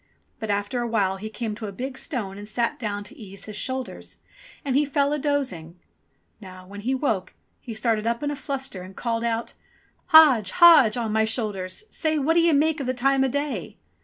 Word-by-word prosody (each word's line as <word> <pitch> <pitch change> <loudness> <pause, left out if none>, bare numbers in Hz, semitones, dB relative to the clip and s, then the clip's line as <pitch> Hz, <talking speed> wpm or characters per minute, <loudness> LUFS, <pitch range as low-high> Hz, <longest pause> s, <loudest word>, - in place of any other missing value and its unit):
But 220 -2 -5
after 205 +5 -1
a 240 - -2
while 200 -4 0
he 215 +3 -6
came 220 -1 -4
to 215 0 -6
a - - -5
big 255 +6 -5
stone 205 -10 -4
and 205 - -9
sat 235 +1 -1
down 205 -3 -3
to 245 +7 -13
ease 200 -6 -11
his 215 - -8
shoulders. 260 +4 -5 0.5
And 265 -2 0
he 290 - +4
fell 285 0 +1
a 300 - -1
dozing. 255 - -2 0.6
Now, 185 -3 -12
when 205 +2 -9
he 255 +5 0
woke, 220 -9 -2 0.2
he 230 -3 -8
started 220 -1 0
up 235 +3 -1
in 290 - -1
a - - -3
fluster, 270 -8 -5
and 185 +1 -11
called 230 -1 -2
out: 230 0 -2 0.5
"Hodge, 270 -11 +7
Hodge, 315 -11 +7
on 230 -3 -2
my 220 0 +3
shoulders! 210 - -3
Say 315 -1 0
What 300 +3 +2
d'ye 335 0 +4
make 300 0 +2
the 255 0 -2
time 270 +2 +2
o' - - +2
day 270 - -3
235 Hz, 205 wpm, -24 LUFS, 205-275 Hz, 0.6 s, Hodge